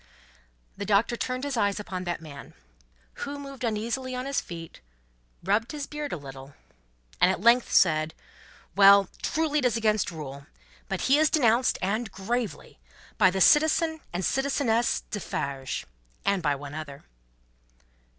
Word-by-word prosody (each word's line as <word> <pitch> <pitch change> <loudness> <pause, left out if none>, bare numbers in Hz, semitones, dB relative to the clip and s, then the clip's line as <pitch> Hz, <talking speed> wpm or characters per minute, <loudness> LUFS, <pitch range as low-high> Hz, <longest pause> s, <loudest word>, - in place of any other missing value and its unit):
The 200 - -4
Doctor 215 +3 +2
turned 255 +2 -3
his 285 -2 -2
eyes 205 -2 +1
upon 185 -3 -5
that 175 -2 -3
man. 140 -3 -11 0.7
Who 285 +1 -4
moved 275 -2 -9
uneasily 235 +4 -2
on 250 +1 -4
his 275 0 -1
feet, 165 -1 -10 0.6
rubbed 215 - 0
his 290 -2 -4
beard 300 0 -5
a - - -3
little, 135 -1 -11 0.7
and 180 - +6
at 190 - 0
length 235 +3 +4
said: 155 -3 +3 0.6
"Well! 200 -1 +7
Truly 310 -2 0
it 265 - -1
is 235 -2 +2
against 215 -2 +1
rule. 140 -4 -8 0.4
But - - -2
he 275 +3 +4
is 310 -1 +4
denounced 245 -4 +3
and 215 +3 -1
gravely 225 +4 -4 0.4
by 190 -3 +6
the 190 +1 -2
Citizen 315 - +4
and 180 +2 -3
Citizeness 270 -4 +1
Defarge. 140 -9 -4 0.4
And 200 -2 +2
by 145 -3 +1
one 140 +1 -9
other." 145 -3 -8
215 Hz, 150 wpm, -27 LUFS, 175-260 Hz, 0.7 s, Well